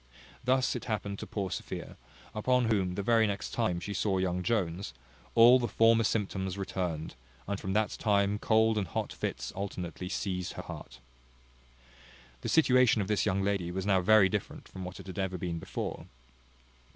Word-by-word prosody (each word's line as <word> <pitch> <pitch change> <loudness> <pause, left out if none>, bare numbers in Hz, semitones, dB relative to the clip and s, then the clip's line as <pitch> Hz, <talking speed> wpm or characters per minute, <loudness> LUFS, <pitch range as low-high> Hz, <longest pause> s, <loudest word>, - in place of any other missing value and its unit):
Thus 130 +1 +2
it - - -5
happened 100 -3 -3
to - - -6
poor 100 -3 -3
Sophia; - - -6 0.4
upon 125 +1 +2
whom, 95 -4 +1
the 100 - -2
very 115 +1 +4
next 100 -3 -3
time 110 -7 0
she 100 +3 -5
saw 100 -1 0
young 90 -1 0
Jones, 95 -2 -1 0.4
all 120 +2 +8
the 120 - -1
former 115 0 +4
symptoms 95 -3 -1
returned, 90 -5 -3 0.3
and 100 0 -2
from 95 -2 -3
that 105 +1 +1
time 100 -1 +1
cold 110 0 +3
and 95 - -2
hot - - -3
fits - - -4
alternately 90 -2 -5
seized 90 -2 -3
her - - -7
heart. 65 +1 -9 1.4
The - - -3
situation 130 -7 +5
of - - -6
this 105 0 +1
young 100 0 +1
lady 100 -3 0
was 95 +2 -3
now 95 -2 +3
very 105 +1 +6
different 100 +1 -4
from 95 - -8
what 90 0 -8
it - - -10
had 95 0 -7
ever 95 -1 -1
been 85 -1 -3
before. - - -5
100 Hz, 175 wpm, -30 LUFS, 90-110 Hz, 1.4 s, all